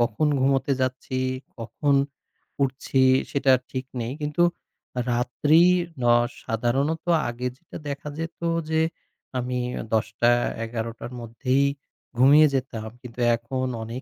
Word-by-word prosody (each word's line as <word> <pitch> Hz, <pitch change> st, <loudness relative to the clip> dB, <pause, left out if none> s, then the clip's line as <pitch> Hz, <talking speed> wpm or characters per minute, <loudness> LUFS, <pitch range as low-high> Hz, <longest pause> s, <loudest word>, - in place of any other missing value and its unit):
কখন 120 Hz, +5 st, +1 dB
ঘুমোতে 135 Hz, +1 st, +2 dB
যাচ্ছি, 130 Hz, 0 st, -2 dB, 0.4 s
কখন 140 Hz, +6 st, 0 dB, 0.7 s
উঠছি 135 Hz, 0 st, +1 dB, 0.3 s
সেটা 140 Hz, -1 st, +3 dB, 0.2 s
ঠিক 130 Hz, 0 st, -3 dB, 0.2 s
নেই। 115 Hz, +2 st, -3 dB
কিন্তু 150 Hz, +4 st, +1 dB, 0.7 s
রাত্রি 145 Hz, +7 st, +3 dB, 0.4 s
ন -, -, -2 dB, 0.4 s
সাধারণত 135 Hz, +8 st, 0 dB, 0.3 s
আগে 120 Hz, +1 st, -3 dB
যেটা 170 Hz, -, -11 dB
দেখা 140 Hz, +1 st, -5 dB
যেত 165 Hz, 0 st, -5 dB, 0.3 s
যে 160 Hz, 0 st, +2 dB, 0.6 s
আমি 125 Hz, 0 st, -2 dB, 0.3 s
১০ঃ০০ 110 Hz, +2 st, +2 dB, 0.3 s
১১ঃ০০ 115 Hz, 0 st, -5 dB
র -, -, -16 dB
মধ্যেই 130 Hz, +4 st, +1 dB, 0.5 s
ঘুমিয়ে 145 Hz, +5 st, +7 dB
যেতাম। 115 Hz, -4 st, -3 dB
কিন্তু 125 Hz, -2 st, -11 dB, 0.2 s
এখন 130 Hz, +3 st, -3 dB, 0.2 s
অনেক 115 Hz, +3 st, -6 dB
130 Hz, 115 wpm, -25 LUFS, 120-140 Hz, 0.7 s, ঘুমিয়ে